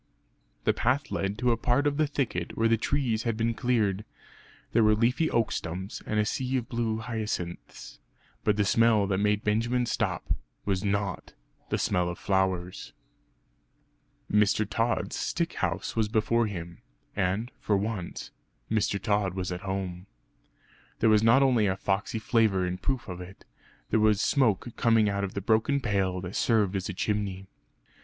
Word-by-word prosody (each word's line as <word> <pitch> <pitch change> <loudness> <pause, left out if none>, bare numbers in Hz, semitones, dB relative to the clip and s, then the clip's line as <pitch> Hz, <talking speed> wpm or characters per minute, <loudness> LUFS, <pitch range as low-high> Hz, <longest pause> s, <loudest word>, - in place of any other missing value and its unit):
The - - +3
path 130 +4 0
led 100 +1 -2
to 125 +1 +2
a 115 - +2
part 125 +5 +1
of 145 -1 +1
the 155 -1 +2
thicket 125 - -2
where 115 - +3
the 115 - +4
trees 115 -1 0
had 115 -2 -2
been 115 +1 +1
cleared; 110 -5 0 0.7
there 115 - +4
were 105 0 +5
leafy 125 +8 +2
oak 115 -2 +1
stumps, 90 +4 -4
and 105 - 0
a 105 - +2
sea 130 +4 -1
of 120 - -3
blue 115 -2 -1
hyacinths 110 -6 -5 0.4
but 105 -1 +2
the 105 - +2
smell 115 0 +4
that 95 -1 0
made 105 +1 +1
Benjamin 120 +4 +1
stop, - - -1 0.3
was 95 -2 0
not 100 -2 -2 0.4
the - - 0
smell 90 -1 +1
of 85 - -5
flowers! 95 -2 -1 1.4
Mr. 105 0 +3
Tod's 115 +3 -1
stick - - -1
house - - -2
was 110 -2 +2
before 115 +2 +1
him 85 -4 -7 0.4
and, 100 +5 -1
for 105 - +1
once, 100 -3 -4 0.4
Mr. 105 -2 +1
Tod 100 -3 0
was 90 -1 -3
at 90 0 -4
home. 95 -1 -4 0.9
There 110 - +3
was 105 -1 +5
not 115 +5 +5
only 120 -6 +3
a 95 0 0
foxey 100 +3 -1
flavour 110 -3 +2
in 90 0 -3
proof 130 +5 -2
of 90 -2 -6
it 90 +2 -12 0.5
there 110 - +3
was 105 -1 +4
smoke 120 -3 +1
coming 115 -2 +4
out 100 0 -1
of 95 - -4
the 100 - -2
broken 110 +7 +2
pail 95 -6 0
that 90 +1 -6
served 105 -4 +2
as 95 0 -2
a - - -3
chimney. 100 -2 -2
105 Hz, 170 wpm, -28 LUFS, 95-115 Hz, 1.4 s, were